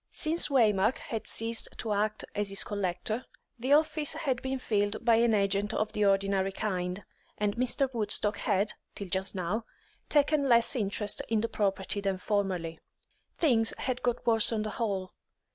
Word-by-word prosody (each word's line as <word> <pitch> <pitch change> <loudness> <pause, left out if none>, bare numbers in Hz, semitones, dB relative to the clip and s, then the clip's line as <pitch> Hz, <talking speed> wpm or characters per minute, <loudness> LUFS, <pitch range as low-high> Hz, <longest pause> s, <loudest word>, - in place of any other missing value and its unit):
Since 325 +2 +1
Waymark 220 -4 +3
had 225 -2 -6
ceased 225 0 0
to 220 -2 -2
act 210 +1 -1
as 205 -1 -1
his 195 - +1
collector, 205 +4 -2 0.4
the 260 +4 +2
office 305 -1 +2
had 280 -6 -2
been 265 0 -2
filled 205 -3 -1
by 230 -2 +5
an 230 -1 +3
agent 200 +1 0
of 215 0 -1
the 210 - +1
ordinary 195 -1 +2
kind, 185 -2 -3 0.3
and 205 -1 0
Mr. 255 +3 +1
Woodstock 210 -1 +1
had, 205 0 0 0.2
till 200 -2 -7
just 190 +2 -1
now, 190 +5 -2 0.5
taken 290 -1 +3
less 235 +2 +5
interest 205 -2 -1
in 220 -1 +2
the 230 - 0
property 200 0 -1
than 195 -1 -1
formerly. 185 -5 -2 0.6
Things 230 -8 +3
had 255 -1 -3
got 245 -1 -1
worse 225 -1 +3
on 220 -2 -1
the 215 - -4
whole. 195 -6 -2
215 Hz, 165 wpm, -29 LUFS, 195-235 Hz, 0.6 s, by